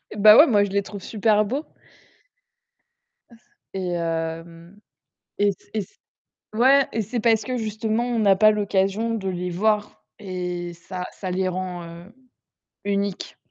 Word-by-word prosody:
Eh - - -8
bah 210 +1 +8
ouais, 305 - +9
moi, 205 -5 +4
je 200 - -2
les 200 0 0
trouve 200 -1 -9
super 215 0 +2
beaux 270 +9 -3 2.1
et 185 -2 -3
hem 165 +2 -5 0.6
et 205 0 +3
c - - -17 0.2
et 215 - 0
c - - -16 0.6
ouais 265 +4 +4
et 225 - 0
c'est 235 +4 -3
parce 225 -1 +2
que 255 -1 -3
justement, 220 +1 -2
on 240 -2 -1
n'a 200 -2 +4
pas 215 +2 +6
l'occasion 205 +2 0
de 195 -3 -3
les 180 0 -3
voir 210 +3 -1 0.2
et 180 -2 -5
ça 180 +2 -7
ça 185 -2 -5
les 185 +1 0
rend, 180 -1 -4
heu, 170 +5 -12 0.7
uniques. 200 -1 -2
200 Hz, 155 wpm, -23 LUFS, 180-215 Hz, 2.1 s, ouais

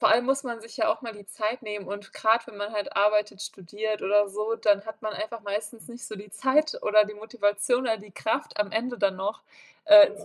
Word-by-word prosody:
Vor 220 - +5
allem 245 +2 +4
muss 270 +1 +2
man 235 -2 -5
sich 230 - -12
ja 215 - +3
auch - - -10
mal 230 -2 -6
die 205 -1 -13
Zeit 220 +5 -3
nehmen 210 -3 -6
und 200 +1 -7
gerade 225 +1 +2
wenn 210 - -11
man 205 +1 -4
halt 205 -2 -4
arbeitet, 210 0 +2
studiert 210 +2 -4
oder 205 +1 +3
so, 215 +3 -2
dann 205 -2 +2
hat 220 - -8
man 215 0 -3
einfach 230 +1 -5
meistens 210 +2 -5
nicht 240 0 -9
so 215 - -7
die 205 +1 -11
Zeit 265 +8 +2
oder 210 0 +5
die 210 0 -8
Motivation 210 +2 0
oder 225 -2 +1
die 205 +1 -14
Kraft, 220 +4 -2
am 210 0 0
Ende 245 +2 -2
dann 195 -1 +1
noch, 200 +3 -3 0.4
äh, 310 -1 +10
ins 205 0 -11
215 Hz, 240 wpm, -27 LUFS, 205-230 Hz, 0.4 s, äh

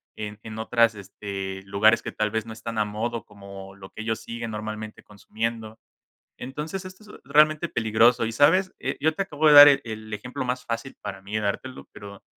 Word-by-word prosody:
en 105 0 -7
en 110 -1 -8
otros 115 0 +2
este, 95 -1 -6
lugares 110 +3 +3
que - - -7
tal 105 -1 -1
vez 110 0 -2
no 110 - -7
están 110 +1 -7
a 105 - +2
modo 110 +2 -4
como 100 -1 -12
lo 95 0 -12
que - - -8
ellos 110 0 -3
siguen 115 -1 -6
normalmente 110 0 -6
consumiendo. 110 +1 -5 0.6
Entonces, 150 +9 -6
esto 185 +3 -11
es 210 - -14
realmente 150 +1 +4
peligroso 115 +1 +3
y, 115 - -4
¿sabes? 185 +10 +3 0.3
Yo 160 +1 +2
te 195 - -1
acabo 155 -5 -1
de - - +7
dar 145 0 +12
el 140 -1 +4
el 110 -1 -8
ejemplo 125 +5 -5
más 125 0 -3
fácil 115 +3 -5
para 95 -2 -7
mí 100 +2 -9
de - - 0
dártelo, 130 +6 -4
pero 100 -1 -11
110 Hz, 200 wpm, -25 LUFS, 105-125 Hz, 0.6 s, dar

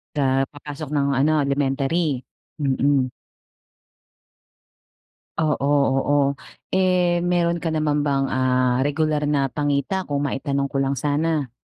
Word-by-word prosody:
Sa 135 -2 +2
papasok 145 +1 -9
ng 140 -1 +1
ano, 155 +2 +3
elementary? 140 +1 0 0.4
Mm. 135 -1 +2 2.3
Oo, 150 -3 0
oo. 140 0 +2 0.5
Eh, 180 -2 +2
mayro'n 175 -1 +1
ka 165 -2 -1
naman 150 -1 0
bang, 135 -1 +1
ah, 130 0 +1
regular 150 0 0
na 140 -2 +1
pangita, 145 +7 -1
kung 145 -1 -2
maitanong 140 0 -1
ko 140 - -3
lang 135 0 +1
sana? 145 +1 -1
145 Hz, 115 wpm, -22 LUFS, 135-155 Hz, 2.3 s, ano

